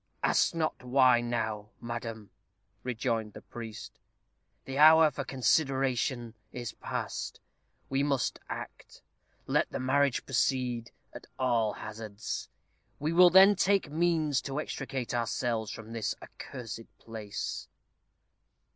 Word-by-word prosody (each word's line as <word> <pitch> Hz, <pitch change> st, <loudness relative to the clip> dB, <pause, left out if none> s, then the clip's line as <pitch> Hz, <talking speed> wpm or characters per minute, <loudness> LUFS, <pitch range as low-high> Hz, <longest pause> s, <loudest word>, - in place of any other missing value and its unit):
"Ask -, -, +3 dB
not 160 Hz, -1 st, -1 dB
why 125 Hz, -1 st, +5 dB
now, 110 Hz, -3 st, -2 dB
madam," 115 Hz, -3 st, -6 dB, 0.5 s
rejoined 115 Hz, -3 st, -2 dB
the -, -, -11 dB
priest. 115 Hz, -2 st, -9 dB, 0.7 s
"The 135 Hz, +1 st, -4 dB
hour 160 Hz, 0 st, +8 dB
for 140 Hz, +1 st, -4 dB
consideration 130 Hz, -3 st, +1 dB, 0.2 s
is 120 Hz, -3 st, -5 dB
past. -, -, -4 dB, 0.5 s
We 135 Hz, +1 st, 0 dB
must 140 Hz, -3 st, 0 dB
act. -, -, -8 dB, 0.4 s
Let -, -, +1 dB
the -, -, -4 dB
marriage 135 Hz, +1 st, +2 dB
proceed, 125 Hz, -2 st, 0 dB, 0.2 s
at -, -, -10 dB
all 120 Hz, -5 st, +2 dB
hazards; 110 Hz, 0 st, -6 dB, 0.5 s
we 155 Hz, +3 st, -1 dB
will 180 Hz, +1 st, +8 dB
then 190 Hz, +3 st, +8 dB
take 195 Hz, -4 st, +2 dB
means 160 Hz, -4 st, +2 dB
to 140 Hz, +1 st, -3 dB
extricate 135 Hz, -5 st, -4 dB
ourselves 115 Hz, -2 st, -1 dB
from 115 Hz, 0 st, -8 dB
this 115 Hz, -2 st, -1 dB
accursed 115 Hz, -3 st, -8 dB
place." 110 Hz, -3 st, -5 dB
125 Hz, 115 wpm, -30 LUFS, 115-140 Hz, 0.7 s, hour